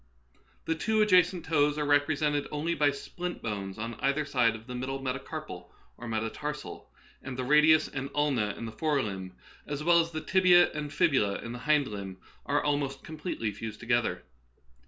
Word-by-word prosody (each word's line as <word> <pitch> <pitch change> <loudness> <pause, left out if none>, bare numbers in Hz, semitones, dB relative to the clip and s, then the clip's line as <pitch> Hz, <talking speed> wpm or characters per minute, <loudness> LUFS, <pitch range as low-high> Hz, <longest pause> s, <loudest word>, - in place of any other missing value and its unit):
The 160 - +1
two 220 +7 0
adjacent 180 -3 +3
toes 150 -2 +2
are 150 - 0
rep 145 0 +3
resented 145 -1 0
only 155 +3 -1
by 150 -3 +3
splint 175 +5 -6
bones 100 -3 -4
on 115 +2 -4
either 140 +2 +1
side 125 -5 +2
of 110 0 -11
the 125 - -7
middle 130 +2 -3
metacarpal 135 0 -6 0.2
or 120 - -9
metatarsal, 115 +7 -4 0.3
and 135 -1 -7
the 130 - -2
ra 150 +4 +4
dius 155 +1 +5
and 135 0 -5
ulna 135 -9 +1
in 115 - -6
the 115 - -6
fore 145 +3 0
limb, 95 -3 -5 0.3
as 145 0 -4
well 170 +1 +5
as 165 0 +1
the 160 -1 -5
tibia 180 -1 +5
and 150 -1 -5
fibula 105 -13 +2
in 115 - -6
the 120 - -6
hind 150 -3 +4
limb, 100 -2 -6 0.3
are 145 +1 +1
almost 140 -2 -1
completely 150 -8 -4
fused 105 +1 -7
together. 120 0 0
145 Hz, 185 wpm, -29 LUFS, 115-155 Hz, 0.3 s, dius